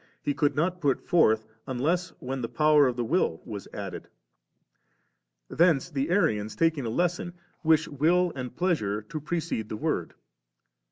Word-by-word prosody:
He 145 - 0
could 145 -1 +1
not 175 +4 0
put 140 -4 +2
forth 110 -10 +4
•, - - -31 0.2
unless 155 +8 0
when 130 +1 -4
the 115 - -3
power 150 -2 +4
of 125 - -1
the 120 - -1
Will 115 - +1
was 105 -3 -7
added. - - -6 1.4
Thence 165 - +2
the 140 +1 -1
Arians 130 - +1
taking 160 -6 +1
a - - -1
lesson, 175 +6 -1 0.3
wish 160 0 +4
will 170 +5 +2
and 125 -2 -6
pleasure 110 - 0
to 150 +8 -6
precede 155 -8 -3
the 110 - -4
Word. - - -2
150 Hz, 160 wpm, -27 LUFS, 120-170 Hz, 1.4 s, forth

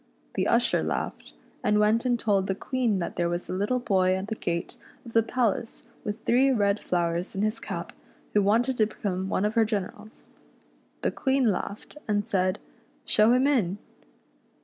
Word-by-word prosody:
The - - 0
usher - - +3
laughed, - - -4 0.3
and 210 - +3
went 215 +3 +3
and 245 -1 +2
told 200 -4 +1
the 190 - 0
Queen 240 -1 0
that 175 - -4
there 175 -1 +1
was 175 +1 -3
a - - -2
little 205 +7 0
boy 185 -6 +2
at 190 +2 -4
the 220 - -2
gate 170 -4 -3 0.3
of 230 - -10
the 225 - +5
palace 225 -1 -1 0.2
with 210 +1 -5
three 260 +3 +4
red 205 -5 +2
flowers 170 0 -1
in 195 - 0
his 215 0 0
cap, - - -6 0.4
who 210 - +4
wanted 235 +6 +2
to 215 - +3
become 190 -3 -3
one 195 - +1
of 210 - 0
her 230 - +4
generals. 215 0 -5 0.7
The - - +1
Queen 265 -4 +2
laughed, 200 +8 -5
and 205 -1 0
said, 185 0 +1 0.3
" - - -36
Show 215 +2 +4
him 255 +2 +3
in." 215 -10 +2
210 Hz, 185 wpm, -27 LUFS, 190-230 Hz, 0.7 s, the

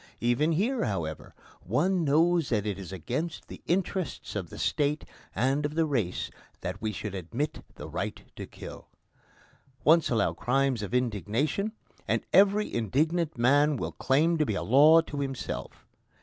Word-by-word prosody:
Even 120 +7 +2
here, 230 - +1
however, 80 -7 -4 0.3
one 170 - +1
knows 160 +2 +3
that 110 -4 0
it 100 -2 -2
is 95 -2 -8
against 130 - -4
the - - -10
interests 180 - -2
of 95 -5 -3
the - - -10
State 150 0 0 0.3
and 135 +5 +1
of 145 +1 -2
the 165 0 +3
race 120 - -1 0.3
that 90 +4 -5
we 110 -1 -1
should 105 0 -5
admit 115 - -4
the - - -8
right - - -4
to - - -7
kill. - - -10 1.0
Once 160 0 +5
allow 110 -4 +1
crimes 130 +1 +1
of 105 +4 -3
indignation, 125 - 0 0.4
and - - 0
every 205 +2 +4
indignant 155 - 0
man 145 +4 +4
will - - -3
claim 160 +5 +2
to 155 - +3
be 105 - -1
a - - -2
law 150 +7 +7
to 145 -3 -6
himself. 135 -2 -5
140 Hz, 160 wpm, -28 LUFS, 110-160 Hz, 1.0 s, law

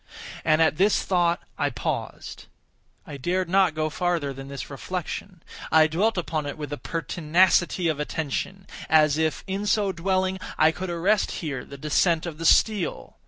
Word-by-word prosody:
And 155 0 +4
at 160 - +1
this 200 +3 +3
thought 175 -2 +1 0.2
I - - +1
paused. - - -5 0.6
I 150 -6 -8
dared 180 +6 -1
not 185 -3 +3
go 155 0 -1
farther 165 -4 -1
than 135 +1 -9
this 140 -1 -6
reflection. 180 +4 -6 0.3
I 160 0 +6
dwelt 190 +8 +1
upon 155 -4 -2
it 145 - -5
with 145 -2 -5
a - - -4
pertinacity 170 +2 +1
of 155 -3 -1
attention—as 155 0 0
if, 160 -1 0
in 195 +2 -3
so 205 -2 +2
dwelling, 185 +1 -1 0.2
I 155 +1 +5
could 185 +3 -6
arrest 185 +5 +1 0.2
here 135 -5 -3
the 140 - -11
descent 155 +3 +1
of 165 -2 -6
the 165 - +1
steel. 210 -2 +2
165 Hz, 165 wpm, -25 LUFS, 155-185 Hz, 0.6 s, I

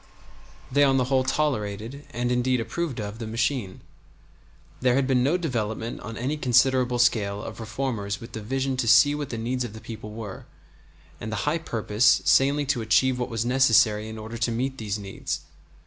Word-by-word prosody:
They 145 +2 +4
on 135 -1 +4
the 130 - +3
whole 130 -1 +4
tolerated, 130 -2 -2
and 120 +1 -2
indeed 125 +1 +1
approved 140 +3 -3
of, 105 +1 -5
the 115 - -5
machine; 115 -1 -1
and 95 - -15 1.0
there 125 -1 +2
had 135 0 +2
been 130 -2 +2
no 145 +8 +2
development 115 -8 -3
on 115 0 -7
any 135 +6 -2
considerable 125 -1 +3
scale 105 -4 +1
of - - -8
reformers 110 -4 -3
with 115 - -10
the 110 - -6
vision 135 +4 -2
to 125 -2 -1
see 140 +5 +6
what 145 -2 -4
the 115 - -4
needs 125 +3 -2
of 120 -4 -6
the 110 - -9
people 110 -2 -8
were, 105 -3 -8 0.7
and 110 - -5
the - - -2
high 155 +3 +1
purpose 110 -5 +2
sanely 140 +2 +4
to 135 -3 0
achieve 125 +3 +2
what 125 - -2
was 115 -1 -2
necessary 115 -4 +3
in 110 - -7
order 110 +2 -7
to 115 0 +1
meet 130 +3 -2
these 105 -2 -3
needs. 100 -2 -5
120 Hz, 195 wpm, -25 LUFS, 110-130 Hz, 1.0 s, see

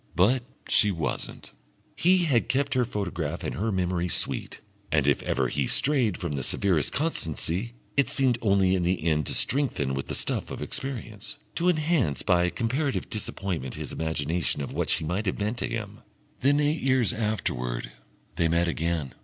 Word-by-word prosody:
But 110 +10 +4 0.3
she 105 - +5
wasn't. 85 -5 -4 0.4
He 180 0 +4
had 130 -7 +2
kept 140 +1 +1
her 125 -2 +2
photograph 90 -7 -3
and - - -3
her 110 +3 -1
memory 90 -2 0
sweet, - - 0 0.3
and 75 -2 +2
if 70 - +3
ever - - 0
he - - -2
had - - -4
strayed 130 -10 +2
from 85 - -4
the 70 -2 -2
severest 85 +3 +2
constancy, 115 - 0 0.2
it 140 - +3
seemed 130 -3 +2
only 100 -3 +3
in 95 - +1
the 90 -1 0
end 75 -2 +1
to - - -1
strengthen 125 - +1
with 70 0 -3
the - - -2
stuff - - 0
of - - -6
experience, 115 -7 -3 0.2
to 175 +2 +1
enhance 155 - +1
by 90 -1 +3
comparative 130 - -1
disappointment 95 - -3
his - - -5
imagination 80 -1 -1
of - - -6
what - - -1
she - - +2
might 90 +7 -2
have 90 - 0
meant 105 +3 -2
to - - -1
him.... 105 -2 -5 0.4
Then 145 +3 +3
eight 150 +2 +1
years 130 -4 +3
afterwards 60 - -2 0.5
they 85 - +3
met 85 +1 +2
again. 80 -4 -1
100 Hz, 180 wpm, -27 LUFS, 80-130 Hz, 0.5 s, she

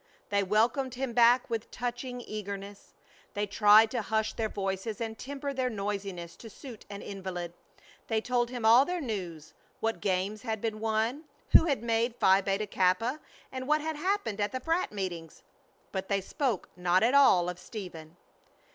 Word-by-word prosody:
They 200 0 +2
welcomed 230 +6 +1
him 260 -1 -3
back 240 +1 +5
with 225 -1 -3
touching 245 +1 -4
eagerness. 200 -2 -7 0.4
They 205 +1 0
tried 210 +2 +6
to 240 - -1
hush 220 +1 -1
their 220 -1 -2
voices 195 +3 -3
and 225 -1 -3
temper 280 +3 -5
their 260 -1 0
noisiness 195 -5 -4
to 225 - -10
suit 235 +1 -11
an 200 0 -7
invalid. 185 -3 -5 0.5
They 225 -1 +1
told 240 +1 0
him 245 -3 -4
all 235 +4 +8
their 355 +4 -2
news, 180 - -5 0.3
what 225 0 -1
games 195 +2 -1
had 220 -3 -3
been 220 0 -3
won, 225 +7 -1 0.3
who - - +8
had 275 -8 0
made 230 +1 +1
Phi 190 -3 +4
Beta 195 +2 -1
Kappa, 200 +8 +1 0.3
and 260 0 -5
what 305 +1 +3
had 315 +1 -3
happened 365 - -1
at 205 - 0
the 260 - -3
frat. 330 +7 0
meetings. 175 -6 -5 0.5
But 190 -1 -3
they 200 -1 +1
spoke 230 - -2
not 180 +2 +2
at 240 +3 +3
all 195 -11 +6
of 180 0 -4
Stephen! 175 -6 -9
220 Hz, 175 wpm, -29 LUFS, 195-245 Hz, 0.5 s, all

